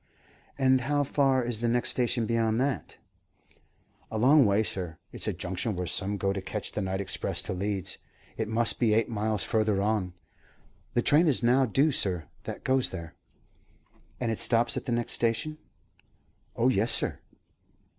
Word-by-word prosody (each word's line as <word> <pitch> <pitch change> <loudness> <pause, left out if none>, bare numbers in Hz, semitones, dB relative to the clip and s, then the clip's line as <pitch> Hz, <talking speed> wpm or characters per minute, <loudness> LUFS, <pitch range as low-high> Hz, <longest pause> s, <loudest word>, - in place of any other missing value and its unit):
"And 130 -1 +3
how 145 +3 0
far 135 -2 +2
is 120 -2 -2
the 120 - 0
next 120 +1 +1
station 120 -2 0
beyond 115 0 0
that?" 135 0 -2 1.1
"A 110 - -4
long 135 +2 +5
way, 100 +2 +2
sir. 90 -6 -4
It's - - -2
a - - +1
junction 95 +4 -3
where 90 0 -3
some 100 +3 -1
go 100 0 0
to 100 - -4
catch 95 +2 -4
the 105 - -3
night 95 0 -2
express 95 -1 -1
to - - -3
Leeds. 95 0 -2 0.4
It 110 - -3
must 115 +1 +4
be 110 -3 +3
eight 115 0 +1
miles 110 -2 0
further 110 -3 +1
on. 100 -3 -1 0.8
The 120 - +2
train 155 +4 +4
is 135 -5 +2
now 130 +2 +4
due, 140 +8 +2
sir, 90 - -1 0.2
that - - -7
goes 130 -1 +2
there." 85 -3 -8 1.1
"And 120 -2 -1
it 110 - -2
stops 120 0 +3
at - - -4
the - - -3
next 120 0 0
station?" 120 +7 -1 1.0
"Oh 120 +3 +2
yes, 115 -2 +1
sir." - - -1
115 Hz, 175 wpm, -28 LUFS, 100-125 Hz, 1.1 s, long